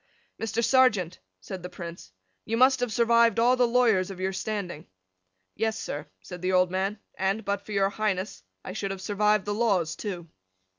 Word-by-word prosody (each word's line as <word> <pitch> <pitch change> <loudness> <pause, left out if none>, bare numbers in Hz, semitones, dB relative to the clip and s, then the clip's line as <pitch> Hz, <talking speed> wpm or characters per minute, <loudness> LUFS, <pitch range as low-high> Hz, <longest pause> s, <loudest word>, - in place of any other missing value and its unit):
"Mr. 225 +1 -1
Serjeant," 215 -10 +3 0.2
said 180 - -7
the 180 - -7
Prince, 170 - -9 0.3
"you 225 - -2
must 260 +2 +5
have 245 -2 -1
survived 235 -1 +4
all 240 +2 +4
the 250 -1 +3
lawyers 230 -6 +3
of 190 -2 -8
your 190 +1 -1
standing." 190 -5 -4 0.7
"Yes, 220 0 -1
sir," 145 +1 -5 0.2
said 180 -2 -9
the 185 +1 0
old 185 -1 +3
man, 195 +3 -1 0.2
"and, 195 +4 0
but 200 0 -1
for 215 - -10
your 195 -1 +2
Highness, 200 - -2 0.2
I 185 - -5
should 200 -1 -3
have 195 -1 -5
survived 210 0 +2
the 205 - -1
laws 195 -8 +1
too." 180 -5 -5
200 Hz, 185 wpm, -27 LUFS, 185-225 Hz, 0.7 s, must